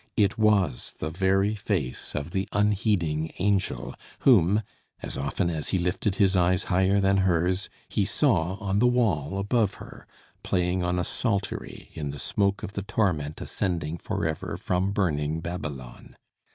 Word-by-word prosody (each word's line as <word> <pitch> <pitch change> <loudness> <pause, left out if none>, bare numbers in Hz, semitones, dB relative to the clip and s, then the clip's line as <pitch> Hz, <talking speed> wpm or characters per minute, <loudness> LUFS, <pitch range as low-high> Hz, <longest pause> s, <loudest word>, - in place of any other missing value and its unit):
It 100 -3 +3
was 105 - +2
the 80 - -4
very 95 +4 +2
face 95 - -3
of 75 +3 -3
the 95 +1 -2
unheeding 100 -7 +1
angel 100 -1 0 0.3
whom, 105 -4 +5 0.4
as - - -5
often 70 +6 -1
as 80 -3 -3
he 95 - +1
lifted 90 +3 0
his 100 -1 +3
eyes 90 +1 +3
higher 95 +2 +3
than 100 0 +3
hers, 90 0 +1 0.2
he - - 0
saw 85 +4 +1
on 100 0 -1
the 125 - +5
wall 100 - +1
above 100 0 +1
her, - - -12 0.3
playing 90 0 0
on 90 0 0
a 90 - +1
psaltery 100 -2 -3
in 75 -2 -4
the 70 - -6
smoke 100 +5 0
of 100 - -5
the 100 - -3
torment 90 -8 -1
ascending 85 -4 -2
for - - -3
ever 80 -1 -3
from 90 +1 0
burning 80 -6 0
Babylon. 75 -7 -7
95 Hz, 155 wpm, -26 LUFS, 80-100 Hz, 0.4 s, whom